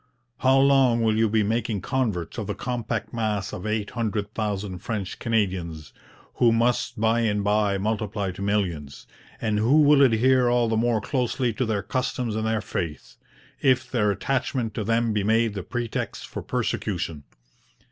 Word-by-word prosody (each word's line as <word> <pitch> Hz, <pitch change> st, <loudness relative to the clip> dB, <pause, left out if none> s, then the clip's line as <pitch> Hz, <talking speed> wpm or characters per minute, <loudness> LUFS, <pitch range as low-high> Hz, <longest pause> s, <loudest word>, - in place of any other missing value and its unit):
'How 130 Hz, +1 st, +4 dB
long 135 Hz, -4 st, +4 dB
will 110 Hz, -1 st, +2 dB
you 110 Hz, 0 st, +2 dB
be 110 Hz, 0 st, +2 dB
making 110 Hz, -1 st, -1 dB
converts 110 Hz, -10 st, -2 dB
of 105 Hz, -, -4 dB
the 105 Hz, -, -3 dB
compact 120 Hz, -3 st, -3 dB
mass 110 Hz, -3 st, -2 dB
of 90 Hz, -, -5 dB
eight 105 Hz, -1 st, -2 dB
hundred 105 Hz, -3 st, -2 dB
thousand 100 Hz, -4 st, -3 dB
French 100 Hz, -2 st, -4 dB
Canadians, 95 Hz, -9 st, -2 dB, 0.4 s
who 120 Hz, -2 st, +5 dB
must 115 Hz, -1 st, +1 dB
by 115 Hz, +1 st, +2 dB
and 105 Hz, -3 st, +1 dB
by 105 Hz, -1 st, +2 dB
multiply 105 Hz, -1 st, -2 dB
to 90 Hz, -, -10 dB
millions, 90 Hz, -9 st, -2 dB, 0.3 s
and 110 Hz, -2 st, 0 dB
who 135 Hz, +8 st, +5 dB
will 145 Hz, -1 st, +6 dB
adhere 130 Hz, 0 st, +4 dB
all 120 Hz, -1 st, +2 dB
the 110 Hz, -, 0 dB
more 115 Hz, -1 st, +1 dB
closely 125 Hz, 0 st, -1 dB
to 125 Hz, +3 st, -1 dB
their 105 Hz, -3 st, -1 dB
customs 125 Hz, +1 st, -2 dB
and 110 Hz, 0 st, -1 dB
their 110 Hz, -1 st, 0 dB
faith, 80 Hz, -7 st, -5 dB, 0.4 s
if 130 Hz, -2 st, +2 dB
their 105 Hz, -5 st, +2 dB
attachment 125 Hz, 0 st, -1 dB
to 105 Hz, -, -3 dB
them 115 Hz, +1 st, +1 dB
be 105 Hz, -1 st, 0 dB
made 110 Hz, +1 st, +2 dB
the 100 Hz, -, -4 dB
pretext 120 Hz, +4 st, -4 dB
for -, -, -6 dB
persecution? 75 Hz, -3 st, -2 dB
110 Hz, 165 wpm, -25 LUFS, 100-120 Hz, 0.4 s, will